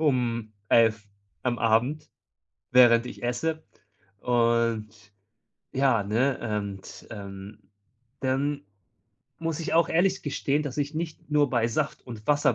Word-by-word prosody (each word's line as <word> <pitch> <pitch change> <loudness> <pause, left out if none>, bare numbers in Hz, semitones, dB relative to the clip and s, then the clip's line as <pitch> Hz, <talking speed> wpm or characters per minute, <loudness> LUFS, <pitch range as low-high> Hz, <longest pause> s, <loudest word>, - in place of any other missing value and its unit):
um 120 -7 0 0.2
11:00 110 -2 +3 0.3
am 120 -1 -1
Abend, 120 +7 +1 0.6
während 120 -1 +6
ich - - -9
esse. 160 +6 -1 0.6
Und 115 -2 +1 0.9
ja, 130 -5 +3
ne? 110 0 0
Und, 100 -1 -8
ähm, 100 0 -8 0.6
dann 140 +2 0 0.8
muss 165 -1 -3
ich 160 - -2
auch 165 0 +4
ehrlich 190 +3 +2
gestehen, 145 0 0
dass 145 -1 -5
ich 145 +1 -1
nicht 160 -1 -5
nur 145 -2 +3
bei 120 -3 +2
Saft 150 +5 -2
und 110 -3 -9
Wasser 145 0 +3
125 Hz, 125 wpm, -27 LUFS, 115-145 Hz, 0.9 s, während